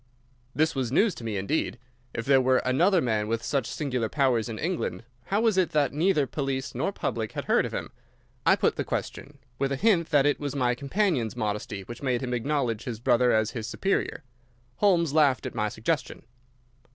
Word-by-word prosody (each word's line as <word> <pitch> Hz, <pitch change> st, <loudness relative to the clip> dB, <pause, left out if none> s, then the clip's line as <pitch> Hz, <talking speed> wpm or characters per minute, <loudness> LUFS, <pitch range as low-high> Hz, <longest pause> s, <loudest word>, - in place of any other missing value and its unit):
This 155 Hz, +1 st, +2 dB
was 130 Hz, -4 st, -2 dB
news 200 Hz, -, +3 dB
to -, -, -10 dB
me 110 Hz, -3 st, -2 dB
indeed. 110 Hz, +8 st, -1 dB, 0.3 s
If 115 Hz, -, -4 dB
there 135 Hz, -1 st, +5 dB
were 130 Hz, 0 st, +3 dB
another 170 Hz, +9 st, +3 dB
man 110 Hz, -5 st, 0 dB
with 115 Hz, +1 st, -2 dB
such 135 Hz, -3 st, -1 dB
singular 125 Hz, -7 st, -2 dB
powers 125 Hz, -5 st, +1 dB
in 110 Hz, -, -5 dB
England, 170 Hz, -6 st, -2 dB, 0.2 s
how 200 Hz, +2 st, 0 dB
was 225 Hz, -4 st, +2 dB
it 185 Hz, -, +1 dB
that 145 Hz, -3 st, +2 dB
neither 155 Hz, -1 st, +2 dB
police 135 Hz, 0 st, -3 dB
nor 140 Hz, +10 st, -1 dB
public 110 Hz, -, -3 dB
had -, -, -4 dB
heard -, -, +2 dB
of -, -, -9 dB
him? -, -, -5 dB, 0.5 s
I -, -, +5 dB
put -, -, +1 dB
the -, -, 0 dB
question, 140 Hz, +1 st, -5 dB, 0.2 s
with 135 Hz, 0 st, 0 dB
a -, -, +1 dB
hint 175 Hz, 0 st, +2 dB
that 145 Hz, -3 st, +4 dB
it 145 Hz, -1 st, +2 dB
was 145 Hz, -2 st, -4 dB
my 125 Hz, -3 st, +2 dB
companion's 140 Hz, -, 0 dB
modesty 105 Hz, -1 st, -3 dB
which 120 Hz, +4 st, -9 dB
made 125 Hz, -3 st, 0 dB
him 125 Hz, -1 st, -2 dB
acknowledge 125 Hz, -3 st, -1 dB
his 115 Hz, -4 st, -4 dB
brother 125 Hz, 0 st, +3 dB
as 110 Hz, 0 st, +2 dB
his 110 Hz, -3 st, -5 dB
superior. 190 Hz, +3 st, -1 dB, 0.5 s
Holmes 170 Hz, -7 st, +3 dB
laughed 145 Hz, -5 st, +3 dB
at -, -, -4 dB
my 105 Hz, -2 st, -1 dB
suggestion. 130 Hz, +10 st, -3 dB
135 Hz, 200 wpm, -27 LUFS, 115-155 Hz, 0.5 s, there